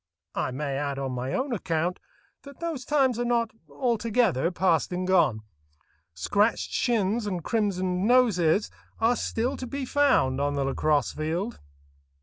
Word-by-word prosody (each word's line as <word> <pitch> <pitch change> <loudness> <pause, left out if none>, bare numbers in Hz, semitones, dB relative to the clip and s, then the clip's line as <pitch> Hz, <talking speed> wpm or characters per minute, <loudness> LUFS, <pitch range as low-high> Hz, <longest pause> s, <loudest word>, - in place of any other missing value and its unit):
I - - -1
may 135 +1 -3
add 140 -1 -2
on 135 -1 -3
my 125 +1 -3
own 260 0 -1
account 175 -3 -1 0.4
that 280 -1 -13
those 325 -7 -4
times 265 -5 +2
are - - +1
not 235 -2 +1 0.2
altogether 225 - +1
past 180 -3 +1
and 180 +1 -2
gone. 165 -12 +3 0.7
Scratched 205 - +1
shins 225 -2 0
and 180 -4 -3
crimsoned 185 -4 0
noses 210 -7 +3 0.3
are 230 +2 +3
still 240 +3 -1
to 255 - -6
be 275 +2 -4
found 255 - +2
on 145 0 0
the 140 - 0
lacrosse 145 +2 +1
field. 170 +9 -3
190 Hz, 145 wpm, -26 LUFS, 155-240 Hz, 0.7 s, gone